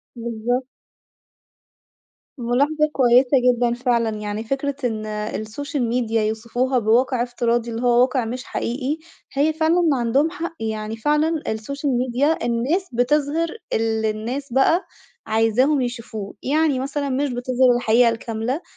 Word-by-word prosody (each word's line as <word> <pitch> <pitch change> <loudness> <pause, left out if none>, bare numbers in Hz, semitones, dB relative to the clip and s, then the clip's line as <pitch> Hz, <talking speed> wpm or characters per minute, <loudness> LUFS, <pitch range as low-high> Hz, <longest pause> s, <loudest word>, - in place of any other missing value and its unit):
بالضبط. 235 +2 -2 1.7
مُلاحظة 285 +6 +1
كويسة 250 0 +4 0.3
جدًا 240 0 +1
فعلًا، 240 -2 +1
يعني 210 +1 -4
فكرة 275 +4 -2
إن 220 -3 -1
السوشيال 215 +5 -3
ميديا 230 -2 0
يوصفوها 240 +4 0
بواقع 240 +3 +2
افتراضي 240 -1 -1
اللي 230 +1 -4
هو 245 0 +4
واقع 255 -1 +2
مش 250 +3 -5
حقيقي، 265 +5 -3 0.4
هي 295 +3 +2
فعلًا 325 +3 +2
ما 310 -5 +2
عندهم 260 +6 +2
حق، 335 -1 -5
يعني 220 0 -3
فعلًا 300 +5 +1
السوشيال 275 +6 -2
ميديا 255 +5 +1
الناس 265 +11 0
بتظهِر 295 +6 +1 0.2
الللي 220 -1 +1
الناس 240 +5 -4
بقى 325 +8 +3 0.4
عايزاهم 225 +6 +2
يشوفوه، 230 -4 -5
يعني 295 -1 +2
مثلًا 280 +1 -2
مش 275 +2 0
بتظهِر 250 0 +2
الحقيقة 240 0 +4
الكاملة، 230 +5 -3
245 Hz, 130 wpm, -22 LUFS, 230-280 Hz, 1.7 s, كويسة